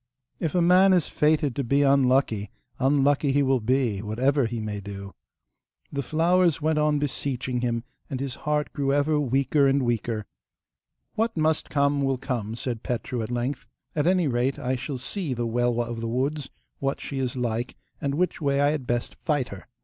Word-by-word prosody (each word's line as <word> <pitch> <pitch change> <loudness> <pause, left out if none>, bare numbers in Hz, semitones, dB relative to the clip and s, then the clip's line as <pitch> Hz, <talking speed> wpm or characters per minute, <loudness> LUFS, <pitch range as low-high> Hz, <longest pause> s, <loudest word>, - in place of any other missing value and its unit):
If 165 0 -2
a 175 - +4
man 185 +2 +6
is 175 -4 +4
fated 150 -4 +1
to 140 - -1
be 140 +4 +2
unlucky, 130 -6 +3 0.3
unlucky 140 +1 +3
he 145 0 +3
will 135 -1 +2
be, 120 -3 +1
whatever 125 +5 +1
he 115 0 -4
may 105 -1 -4
do! 100 0 -8 0.8
The 140 - -1
flowers 170 +4 +2
went 155 0 +1
on 150 0 +2
beseeching 130 -3 -2
him, 115 -2 -1 0.3
and 135 -3 -3
his 135 -2 -3
heart 150 +1 -2
grew 140 -1 0
ever 145 +2 +2
weaker 140 +1 +2
and 135 0 +2
weaker. 115 -2 -1 0.9
'What 225 -2 -1
must 155 0 +1
come 140 -1 +2
will 135 -1 +1
come,' 120 -5 -3
said 120 -1 -4
Petru 120 -1 -3
at 110 - -4
length; 125 +3 -3 0.3
'at 150 +1 +1
any 180 -3 +3
rate 125 +1 0
I 130 +1 -1
shall 135 +2 -4
see 145 +2 -3
the 120 0 -2
Welwa 120 0 0
of 115 -1 -5
the 115 - -2
woods, 135 +5 -1 0.3
what 135 0 -1
she 140 - -5
is 130 -1 -2
like, 120 0 -2 0.3
and 140 0 -1
which 180 +2 0
way 140 -1 +1
I 145 +1 +4
had 145 -5 -3
best 120 0 -2
fight 145 -5 0
her. 100 - -10
135 Hz, 190 wpm, -26 LUFS, 120-145 Hz, 0.9 s, man